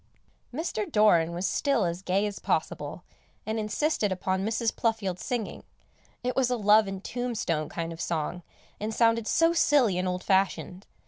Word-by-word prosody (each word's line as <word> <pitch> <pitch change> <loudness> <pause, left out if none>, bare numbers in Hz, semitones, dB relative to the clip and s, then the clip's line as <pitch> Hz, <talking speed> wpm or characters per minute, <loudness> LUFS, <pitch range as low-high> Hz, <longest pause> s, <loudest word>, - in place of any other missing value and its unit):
Mr. 255 -7 -3
Doran 175 -6 +4
was 175 +2 -3
still 275 -5 +1
as 170 +1 -3
gay 195 +2 +1
as 205 -1 -4
possible, - - -2 0.4
and 220 +1 -2
insisted 215 0 0
upon 185 +1 -1
Mrs. 225 +2 0
Pluffield 210 -6 -1
singing; 240 -4 -4 0.6
it 250 0 -1
was 260 -2 +2
a 250 - 0
love 210 0 +5
and 195 0 -6
tombstone 220 -11 -2
kind 165 0 -4
of 165 - -8
song, 170 +2 -2 0.4
and 215 +1 -3
sounded 230 -1 +3
so 330 0 +3
silly 275 - +3
and 185 - -1
old 180 0 -2
fashioned. 190 -1 0
210 Hz, 160 wpm, -27 LUFS, 185-230 Hz, 0.6 s, love